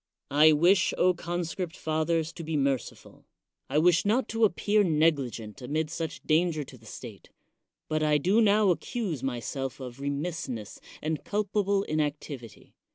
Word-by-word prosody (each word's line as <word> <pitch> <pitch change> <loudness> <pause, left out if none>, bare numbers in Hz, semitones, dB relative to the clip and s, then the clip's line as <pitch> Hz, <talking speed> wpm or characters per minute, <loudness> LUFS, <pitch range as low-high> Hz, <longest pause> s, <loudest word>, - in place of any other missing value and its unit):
I 150 +2 +7
wish, 175 +6 +4 0.2
conscript 175 +1 -4
fathers, 160 +1 0
to 170 - -8
be 160 -1 -2
merciful; 135 -2 -3 0.4
I - - 0
wish 175 +2 +4
not 220 +4 +1
to 225 0 +3
appear 210 +2 +2
negligent 145 - 0
amid 150 +4 -2
such 160 -2 -5
danger 155 -1 +2
to 135 - -13
the 110 - -17
state; - - -10 0.6
but 155 0 -1
I 150 -1 +3
do 190 +10 +3
now 210 -2 +4
accuse 180 - -3
myself 135 +1 -3
of 125 -1 -8
re 140 +1 -2
missness 140 - -4 0.2
and 155 -1 -2
culpable 200 -1 0
inactivity. 145 - -4
155 Hz, 145 wpm, -28 LUFS, 140-180 Hz, 0.6 s, I